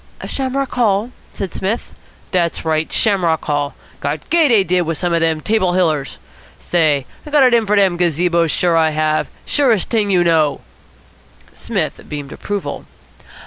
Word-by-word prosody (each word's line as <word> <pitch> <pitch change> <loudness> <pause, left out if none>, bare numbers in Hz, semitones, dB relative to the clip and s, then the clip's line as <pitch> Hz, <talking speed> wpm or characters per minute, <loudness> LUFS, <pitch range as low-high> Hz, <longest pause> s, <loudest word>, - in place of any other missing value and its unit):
"Shamrock 270 0 -2
Hall?" 220 -1 +1 0.2
said 195 -3 -5
Psmith. 205 +5 -3 0.4
"Dat's 170 -3 0
right. 160 0 0
Shamrock 180 -7 +1
Hall. 145 -1 -1 0.2
Got 145 +1 -4
gay, 335 -2 +5
dey 225 -7 +4
did, 180 0 +1
wit 165 -2 -2
some 175 -2 -1
of 170 - +2
de 165 -1 +1
Table 190 -1 +1
Hillers. 155 -6 0 0.4
Say, 155 -6 +1 0.2
I - - -10
got 295 -2 +4
it 250 -2 +4
in 230 -2 +3
for 210 - +2
dem 190 -3 +3
gazebos, 170 0 +1
sure 175 +2 +1
I 160 -1 +3
have. 155 0 0 0.2
Surest 245 - +1
t'ing 215 -3 +1
you 180 -3 +3
know." 160 -4 +2 0.9
Psmith - - -3
beamed 145 -2 -6
approval. 205 -1 -5
175 Hz, 160 wpm, -17 LUFS, 160-210 Hz, 0.9 s, gay